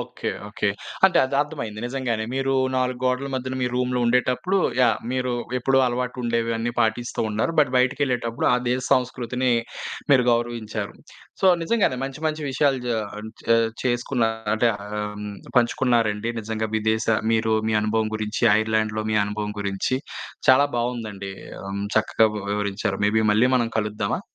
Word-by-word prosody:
Okay. - - -5 0.2
Okay. 105 0 -1 0.4
అంటే 190 - +5
అది 130 +1 -1
అర్థమయింది 130 -8 -4
నిజంగానే 120 -3 -2
మీరు 135 0 0 0.2
4 130 -1 0
గోడల 125 +2 +1
మధ్యన, 130 0 -3
మీ - - +2
రూమ్‌లో 125 0 0
ఉండేటప్పుడు, 125 +10 +2 0.2
యాహ్! 120 -4 +4
మీరు 130 -1 -1 0.3
ఎప్పుడూ 135 +2 +2
అలవాటుండేవి 120 -2 -1
అన్ని 120 +1 -2
పాటిస్తూ 115 +2 0
ఉన్నారు. 110 +10 0
బట్ 140 -4 +5
బయటికి 125 +3 +2
ఎళ్ళేటప్పుడు 120 -3 -1
ఆ - - +5
దేశ 125 +1 +1
సంస్కృతిని 125 0 -1 0.6
మీరు 125 -2 +5
గౌరవించారు. 115 -3 -2 0.5
సో, 190 - +3 0.2
నిజంగానే 195 - +1
మంచి 135 +1 -6
మంచి 155 0 -2
విషయాలు 135 0 +2
జే 120 - 0 0.6
చే 115 - +7 0.4
చేసుకున్నారు 115 -3 -1
అంటే, 115 +2 +3 0.2
హ్మ్ 105 0 -4 0.3
పంచుకున్నారండి 115 -3 +2
నిజంగా 110 0 -3
విదేశ 110 0 0 0.3
మీరు 110 0 +2 0.2
మీ 110 - +1
అనుభవం 110 0 +1
గురించి, 110 0 -4 0.2
ఐర్‌లాండ్‌లో 110 0 0
మీ - - +2
అనుభవం 105 0 -3
గురించి 100 +5 -1 0.5
చాలా 130 +2 +7
బాగుందండి. 110 -5 -3 0.3
ఆహ్, 95 - -6
హ్మ్. 100 +1 -3
చక్కగా 110 0 +3 0.2
వివరించారు. 100 -1 -2
మేబీ 110 +2 +2
మళ్ళీ 120 +4 +4
మనం 120 -2 +1
కలుద్దామా? 105 - -1
120 Hz, 145 wpm, -23 LUFS, 110-125 Hz, 0.6 s, చే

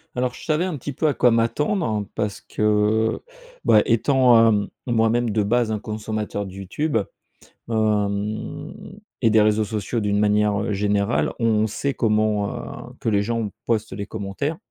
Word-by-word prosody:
Alors 125 0 -1
je - - -11
savais 155 +3 +1
un 170 -6 -3
petit 140 +2 -6
peu 155 - 0
à 145 - +1
quoi 125 - +4
m'attendre 115 - 0
parce 105 -2 -3
que, 105 +1 +1 0.5
bah 105 - +6
étant, 120 -1 +4
hem, 105 -2 +1 0.2
moi-même 115 -1 +1
de 105 0 +1
base 115 +2 +1
un 105 - -1
consommateur 105 -1 -4
de 95 - -9
YouTube. 100 - -2 0.7
Hem 105 -1 -2 0.3
et 110 - +5
des 110 0 +5
réseaux 110 0 +2
sociaux 110 +2 -3
d'une 105 0 0
manière, 105 0 +2
heu, 105 +1 -1
générale, 100 +2 +1
on 110 -2 +2
sait 140 +6 -2
comment, 105 -2 +1 0.4
heu, - - -14
que - - -3
les 100 -1 +2
gens 115 -1 -2 0.2
postent 110 -2 0
les 100 +1 -5
commentaires. 110 +10 -4
110 Hz, 165 wpm, -22 LUFS, 105-120 Hz, 0.7 s, bah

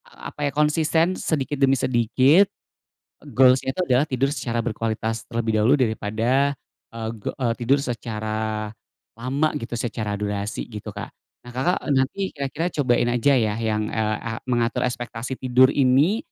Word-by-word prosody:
A - - -10
apa 145 -1 -1
ya - - -7
konsisten, 160 +3 +2
sedikit 145 -5 -2
demi 135 0 +4
sedikit 130 - +3 0.8
goals-nya 130 0 +4
itu 185 - -5
adalah 130 +2 +3
tidur 135 -2 0
secara 120 -5 -3
berkualitas 110 -1 -2
terlebih 115 -2 0
dahulu 110 +6 +4
daripada, 120 +4 +1 0.4
eee, 115 +2 -3
tidur 130 +4 +2
secara 110 -3 -3 0.5
lama 130 +7 0
gitu 120 -4 -4
secara 110 -3 -3
durasi 105 0 -3
gitu, 105 -3 -8
Kak. - - -7 0.4
Nah, - - -8
Kakak 135 +9 +1 0.2
nanti 140 +9 0
kira-kira 140 +4 -3 0.2
cobain 120 -2 +2
aja 125 +4 +3
ya 110 -3 +1
yang, 110 -1 -1
eee, 110 -1 -1
a 115 - -4 0.2
mengatur 120 -1 0
ekspektasi 120 0 -4
tidur 130 +1 +4
ini, 140 - +3
125 Hz, 145 wpm, -23 LUFS, 110-135 Hz, 0.8 s, demi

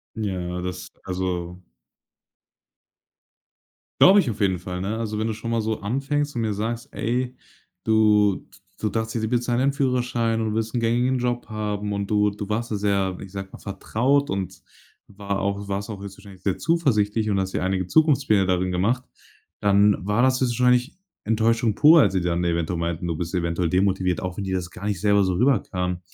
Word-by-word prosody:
Ja, 90 -4 -3
das 90 0 -6
also 90 -1 -3 2.4
glaube 195 +2 +8
ich 135 - -2
auf 105 - -8
jeden 95 -3 +1
Fall, 90 0 -5
ne? 105 +4 -2
Also 110 -2 -3
wenn 110 - 0
du 110 - -1
schon 115 +2 -5
mal 115 - +1
so 110 -1 -2
anfängst 140 +6 -1
und 120 - -2
mir 110 -2 0
sagst: 115 +3 -3
„Ey, 125 +2 -2 0.5
du 105 -3 +3
d - - -18 0.2
du 110 - 0
dachtest, 110 +1 -2
sie 110 - -1
bezahlen 120 0 0
deinen 140 +1 +2
Führerschein 125 -4 0
und 110 -1 -1
willst 110 0 -2
'n 120 - 0
gängigen 120 +3 +1
Job 120 -1 -2
haben“ 105 -1 -3
und 100 -1 -3
du 105 -1 +3
du 100 0 -7
warst 115 +2 -2
da 105 - 0
sehr, 100 -2 0
ich 95 0 -10
sage 95 -1 -6
mal, - - -10
vertraut 125 +8 0
und 95 -2 -4 0.5
war 100 0 -4
auch 100 0 -1
du 100 - -8
warst 100 +2 -3
auch 100 -2 -6
höchstwahrscheinlich 100 -1 -11
sehr 95 - 0
zuversichtlich 110 -10 +1
und 100 -1 +1
hast 95 0 -4
dir - - -1
einige 95 -1 -1
Zukunftspläne 135 - +3
darin 90 0 0
gemacht, 115 +8 0 0.6
dann 100 0 +4
war 105 +4 +1
das 130 0 +3
höchstwahrscheinlich 125 +3 +2 0.3
Enttäuschung 115 0 +2
pur, 160 +2 +7
als - - +3
sie 95 - +1
dann 85 0 0
eventuell 85 0 -1
meinten: 85 +1 -2
„Du 85 -2 -2
bist 85 +1 -4
eventuell 85 0 0
demotiviert,“ 95 -1 +1
auch 90 -1 -5
wenn 100 - -3
dir 95 0 -1
das 90 -1 -4
gar 100 - -9
nicht 100 -5 -2
selber 100 -2 +3
so 95 - 0
rüberkam. 90 -6 0
105 Hz, 195 wpm, -24 LUFS, 95-115 Hz, 2.4 s, glaube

